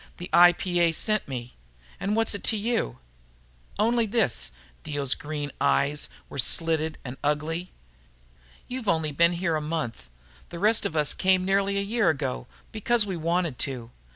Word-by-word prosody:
The 175 - -8
IPA 175 -1 +5
sent 215 +4 0
me. 125 -3 -6 0.5
And 205 +2 -1
what's 225 0 +2
it 200 - -5
to 220 - +3
you?" 205 - -1 0.8
"Only 230 +1 +2
this." 135 - +1 0.3
Dio's 140 -3 0
green 145 -1 -5
eyes 145 +1 +1 0.2
were 140 - -7
slitted 160 +3 +1
and 130 +1 -6
ugly. 155 +4 -1 1.0
"You've 250 -3 -5
only 160 -4 +1
been 170 +4 +3
here 170 -1 -1
a 155 - -1
month. 150 - -4 0.4
The 170 - -7
rest 215 +5 +3
of 160 - -9
us 150 -2 +2
came 185 -1 +2
nearly 195 +1 +1
a - - +2
year 220 -1 +1
ago 135 -5 -2 0.2
because 225 +1 +2
we 190 -3 -3
wanted 170 -3 -1
to. 125 -4 -3
170 Hz, 155 wpm, -26 LUFS, 145-200 Hz, 1.0 s, IPA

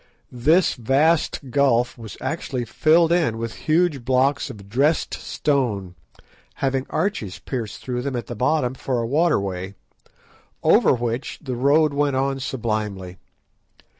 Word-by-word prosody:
This 150 +9 +3
vast 140 +2 +1
gulf 125 -3 +2
was 110 -3 -10
actually 135 -6 -3
filled 165 +6 +3
in 160 -10 +2
with 115 -1 -4 0.2
huge 155 -5 +2
blocks 130 +3 +1
of 100 -2 -10
dressed 140 +9 +1
stone, 115 - -1 0.6
having 135 -1 -1
arches 115 - -2
pierced 115 -6 -6
through 125 -1 -3
them 135 0 -3
at 120 - -3
the - - -6
bottom 125 +2 +1
for 130 -1 -2
a 115 - -1
waterway, 100 - 0 0.9
over - - +5
which 120 +1 -3
the 130 -5 -5
road 145 +4 +3
went 140 -1 +1
on 135 +1 0
sublimely. 110 -8 -3
130 Hz, 135 wpm, -22 LUFS, 115-145 Hz, 0.9 s, over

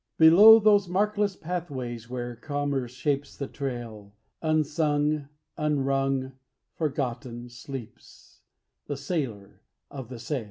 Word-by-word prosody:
Below 195 +8 +9
those 205 -3 +4
markless 205 +1 0
pathways 130 -10 -5
where 120 -1 -4
commerce 140 -1 -2
shapes 140 +2 -2
the 140 - -4
trail, 115 -6 -6 0.3
Unsung, 150 -1 +1 0.3
unrung, 135 -3 0 0.4
forgotten, 125 -5 -3
sleeps 120 0 -11 0.5
The 145 - -3
Sailor 135 - -4 0.3
of 130 -4 -8
The 125 - -7
Sail. 120 +5 -3
140 Hz, 105 wpm, -27 LUFS, 125-155 Hz, 0.5 s, Below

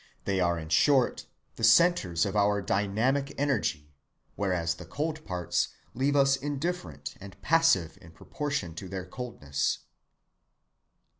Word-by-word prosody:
They 100 -1 0
are 85 -1 +2
in 80 -1 -7
short 130 - +3 0.3
the 115 - -7
centres 110 - +4
of 100 - -3
our 105 0 +3
dynamic 110 +9 0
energy, 100 - -1 0.4
whereas 90 -4 0
the 85 +1 -11
cold 155 - -3
parts 90 -1 -1 0.3
leave 135 +3 +1
us 135 -1 +5
indifferent 140 - -4
and 95 -1 -11
passive 165 - +3
in 80 - -14
proportion 140 - -4
to 90 +3 -8
their 95 -1 -5
coldness. 90 - -3
100 Hz, 130 wpm, -28 LUFS, 85-140 Hz, 0.4 s, us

